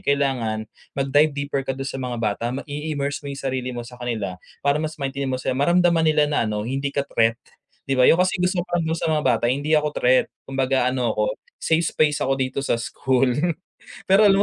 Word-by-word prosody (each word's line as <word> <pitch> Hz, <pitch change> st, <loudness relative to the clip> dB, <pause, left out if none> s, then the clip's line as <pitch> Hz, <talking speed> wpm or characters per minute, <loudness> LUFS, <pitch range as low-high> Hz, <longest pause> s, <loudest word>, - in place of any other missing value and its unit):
kailangan, 125 Hz, -6 st, 0 dB, 0.3 s
mag 135 Hz, 0 st, 0 dB
dive 150 Hz, +1 st, +5 dB
deeper 140 Hz, -1 st, -2 dB
ka 135 Hz, -, -1 dB
dun 135 Hz, +1 st, -5 dB
sa -, -, -5 dB
mga 125 Hz, -1 st, -3 dB
bata, 105 Hz, +1 st, -1 dB
mag 135 Hz, -, -5 dB
i-immerse 145 Hz, -1 st, -3 dB
mo 140 Hz, -, -4 dB
yung 140 Hz, -, -7 dB
sarili 130 Hz, -1 st, -2 dB
mo 120 Hz, -, -5 dB
sa 125 Hz, +1 st, -11 dB
kanila, 110 Hz, -6 st, -3 dB, 0.3 s
para 140 Hz, 0 st, +3 dB
mas 155 Hz, 0 st, -4 dB
maintindi 140 Hz, 0 st, -2 dB
mo 130 Hz, -, 0 dB
sila, 130 Hz, -, -1 dB
maramdaman 170 Hz, +3 st, +3 dB
nila 150 Hz, -1 st, +4 dB
na 145 Hz, -5 st, +1 dB
ano, 105 Hz, 0 st, -2 dB
hindi 135 Hz, +2 st, -1 dB
ka 140 Hz, -, 0 dB
threat, 115 Hz, 0 st, +2 dB, 0.5 s
di -, -, +1 dB
ba 125 Hz, -, +5 dB
yung -, -, +6 dB
kasi 185 Hz, +2 st, +2 dB
gusto 180 Hz, 0 st, +1 dB
ko 175 Hz, -1 st, -1 dB
dun 160 Hz, +1 st, -1 dB
sa 165 Hz, -, -2 dB
mga 150 Hz, -1 st, 0 dB
bata 120 Hz, -3 st, +2 dB
hindi 140 Hz, +5 st, 0 dB
ako 150 Hz, 0 st, +2 dB
threat, 130 Hz, +1 st, +4 dB, 0.2 s
kumbaga 135 Hz, -1 st, +1 dB
ano 125 Hz, -2 st, 0 dB
ako, -, -, -1 dB, 0.2 s
safe 165 Hz, +1 st, +2 dB
space 150 Hz, -2 st, +1 dB
ako 135 Hz, -, +1 dB
dito 130 Hz, +1 st, -1 dB
sa 120 Hz, -, +1 dB
school. 130 Hz, +2 st, +1 dB, 0.8 s
Pero 195 Hz, +3 st, +5 dB
alam 195 Hz, -, +5 dB
140 Hz, 220 wpm, -23 LUFS, 125-150 Hz, 0.8 s, yung